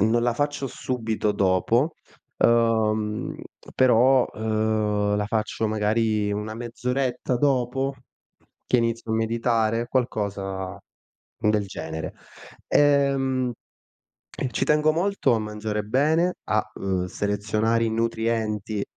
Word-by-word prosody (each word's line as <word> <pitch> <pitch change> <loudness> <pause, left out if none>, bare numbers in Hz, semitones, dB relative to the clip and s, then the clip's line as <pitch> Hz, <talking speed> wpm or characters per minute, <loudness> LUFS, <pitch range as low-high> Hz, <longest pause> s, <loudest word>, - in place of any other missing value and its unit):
non 115 +3 +3
la 120 - +2
faccio 145 +1 -2
subito 110 -5 -2
dopo, 100 - +2 0.4
uhm, 110 -2 +2 0.4
però, 130 +1 +5
uhm, 110 -1 0
la 105 0 -1
faccio 110 0 -1
magari 110 0 +1
una 105 +1 -3
mezz'oretta 125 +2 -2
dopo, 135 0 +1 0.7
che - - +3
inizio 115 -1 -1
a - - +2
meditare, 115 0 0
qualcosa 100 -6 -2 0.6
del 105 -1 +1
genere. 80 -3 -6 0.5
Ehm, 135 -3 +2 1.0
ci - - 0
tengo 150 +1 +3
molto 175 -3 +1
a - - 0
mangiare 105 0 -3
bene, 155 - +2
a, 110 0 +1
uhm, 95 -2 -1
selezionare 105 +4 0
i - - 0
nutrienti, 110 -2 -1
115 Hz, 105 wpm, -24 LUFS, 105-125 Hz, 1.0 s, però